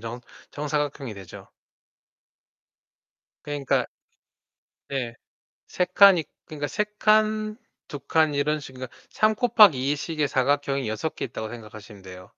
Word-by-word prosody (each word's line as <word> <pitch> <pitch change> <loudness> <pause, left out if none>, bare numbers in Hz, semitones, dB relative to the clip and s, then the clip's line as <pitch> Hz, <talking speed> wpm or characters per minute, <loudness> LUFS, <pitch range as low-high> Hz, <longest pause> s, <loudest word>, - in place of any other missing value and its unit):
정 115 +2 -7 0.3
정사각형이 145 -5 -3
되죠. 95 -3 -12 2.0
그러니까 145 -2 -1 1.0
네. 125 -4 -3 0.5
3 180 - 0
칸이 195 -6 +7 0.2
그러니까 150 -3 -5
3 210 +8 -1
칸, 215 0 +2 0.3
2 145 - -6
칸 155 +2 +1
이런 150 +2 0
식 140 - -11
그러니까 130 -1 -9
3 215 0 +2
곱하기 200 - +5
2 - - +1
식의 150 0 -2
사각형이 140 -1 0
6 110 +9 -2
개 - - -4
있다고 110 -2 -6
생각하시면 110 -3 -11
돼요. 90 -1 -11
145 Hz, 235 characters per minute, -25 LUFS, 120-160 Hz, 2.0 s, 칸이